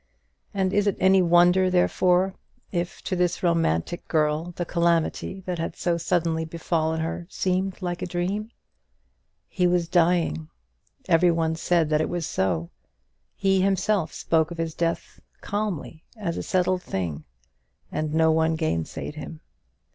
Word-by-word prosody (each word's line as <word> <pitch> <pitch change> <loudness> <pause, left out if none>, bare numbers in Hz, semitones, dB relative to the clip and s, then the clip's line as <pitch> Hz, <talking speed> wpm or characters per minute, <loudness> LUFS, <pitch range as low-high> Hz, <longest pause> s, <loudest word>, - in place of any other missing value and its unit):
And 190 -1 0
is 205 0 +2
it 200 - +1
any 190 0 +5
wonder, 175 +2 +5
therefore, 185 +1 +2 0.4
if 175 -1 -3
to 185 - -2
this 175 -1 0
romantic 165 - 0
girl 155 +2 +1
the 175 - -2
calamity 170 +2 0
that 180 -2 -4
had 165 - -3
so 175 -1 0
suddenly 165 -1 0
befallen 160 0 -1
her 165 +1 -4
seemed 185 0 -1
like 175 0 -3
a 180 - -2
dream? 185 +5 -2 1.0
He 180 -2 +1
was 175 -1 +1
dying! 165 - +1 0.6
every 175 +2 +5
one 165 -1 +1
said 165 -1 +1
that 155 0 +3
it - - -1
was 175 -2 -2
so; 85 - -1 0.6
he 195 -1 +2
himself 195 -1 +1
spoke 160 -1 +1
of 170 - -7
his 165 -1 -2
death 165 +1 -2 0.2
calmly 200 -6 -4
as 175 -6 -3
a - - -3
settled 185 0 +1
thing; 85 - -4 0.7
and 155 -1 -2
no 160 +1 +4
one 160 0 +2
gainsayed 155 - -2
him. 75 0 -8
170 Hz, 145 wpm, -25 LUFS, 160-185 Hz, 1.0 s, any